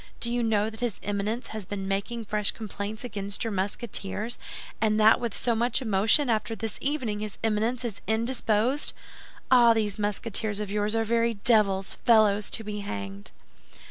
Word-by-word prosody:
Do 235 - 0
you 240 0 0
know 220 -1 +1
that 220 - -10
his 240 -4 -1
Eminence 205 +4 -2
has 215 -4 -6
been 195 -1 -4
making 210 +4 -2
fresh 210 -1 +1
complaints 210 0 -5
against 200 -3 -4
your 225 - -2
Musketeers, 205 +2 -3 0.4
and 215 -1 +2
that 220 +2 +6
with 235 -3 -3
so 240 - +1
much 235 +2 +1
emotion, 220 +4 +3
that 220 -2 +2
this 225 0 -5
evening 260 -8 -1
his 210 -1 -5
Eminence 225 +3 0
is 220 -4 -5
indisposed? 230 +3 +1 0.6
Ah, 240 -2 +7
these 210 -2 -1
Musketeers 210 0 -1
of 210 -2 -4
yours 210 +1 0
are 225 - +2
very 230 +1 +1
devils—fellows 205 0 +3
to 225 - -2
be 210 -1 -5
hanged." 100 - -6
215 Hz, 165 wpm, -27 LUFS, 205-230 Hz, 0.6 s, Ah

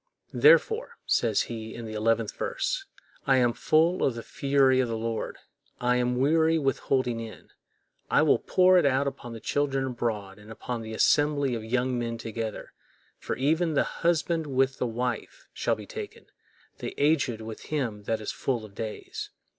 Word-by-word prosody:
"Therefore," 450 +2 +4
says - - +2
he, 110 -1 -6
in 115 - -7
the 110 - -6
eleventh 115 0 +1
verse, - - -2 0.4
"I 135 -1 +5
am 120 -2 +3
full 165 +7 +2
of 130 - +1
the 115 - -6
fury 135 -3 +2
of 130 - +2
the 115 -1 -2
Lord; 115 0 -3 0.4
I 125 0 +2
am 125 0 0
weary 160 +4 +3
with 135 -4 0
holding 125 -3 0
in; 115 -1 -9 0.6
I - - +4
will - - +4
pour 185 0 +4
it - - +1
out 135 +1 +2
upon 120 -4 -5
the 115 - -7
children 135 +1 0
abroad, 110 -6 -3
and 105 +1 -15
upon 120 +1 -5
the 110 0 -6
assembly 145 0 +3
of 115 -2 -3
young 125 +2 0
men 115 -1 -3
together; 115 -1 -5 0.5
for - - -3
even 160 +4 +1
the - - +4 0.2
husband 165 -1 +1
with 135 -1 +1
the 125 - 0
wife 120 0 -4
shall - - 0
be - - -10
taken, - - -8 0.5
the - - -5
aged 140 -6 +2
with 110 0 -8
him 115 -9 -3
that 110 0 -1
is 105 - -3
full 120 -5 -2
of 105 - -14
days. 110 +1 -6
125 Hz, 180 wpm, -27 LUFS, 115-145 Hz, 0.6 s, I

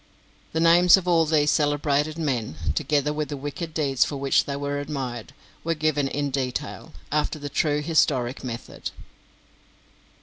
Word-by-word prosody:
The 160 - -1
names 170 +2 +7
of 185 -1 -4
all 165 -2 +4
these 150 -1 +3
celebrated 145 +1 +1
men, 125 - -2 0.2
together 145 - 0
with 150 0 -3
the 145 - -4
wicked 145 +4 -5
deeds 140 -5 +2
for 145 - -4
which 135 0 +2
they 140 - -3
were 145 0 -2
admired, 130 -5 -5 0.3
were 165 0 0
given 150 -2 +1
in 145 +1 -2
detail, 130 -2 -4 0.2
after 150 +1 0
the 145 -1 -6
true 150 0 0
historic 135 -6 +1
method. 120 -2 -6
145 Hz, 155 wpm, -25 LUFS, 135-155 Hz, 0.3 s, names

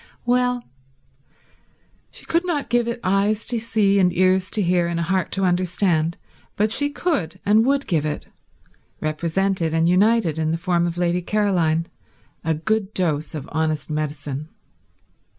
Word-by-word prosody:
Well, 250 0 +1 1.5
she - - -11
could 335 +2 +1
not 330 -6 -2
give 240 -1 +2
it 235 0 -3
eyes 200 +3 +1
to 240 -2 +1
see 215 -3 +2
and 180 -2 +4
ears 185 +1 +2
to 210 - +2
hear 175 -1 +2
and 170 0 -2
a - - 0
heart 185 +2 -1
to 195 - 0
understand, 175 -2 +1 0.4
but 215 +1 +1
she 285 +5 +2
could 275 - -2
and 215 +2 +5
would 280 0 +1
give 160 -4 0
it, 150 -1 -3 0.7
represented 165 +2 -1
and 165 0 +3
united 185 -3 +3
in 160 0 0
the 165 - 0
form 175 0 0
of 170 0 -4
Lady 175 0 +1
Caroline, 175 -5 +1 0.6
a 160 0 0
good 210 +5 -1
dose 155 -5 -1
of 150 -1 -6
honest 155 0 -1
medicine. 150 -1 -4
180 Hz, 155 wpm, -22 LUFS, 160-215 Hz, 1.5 s, and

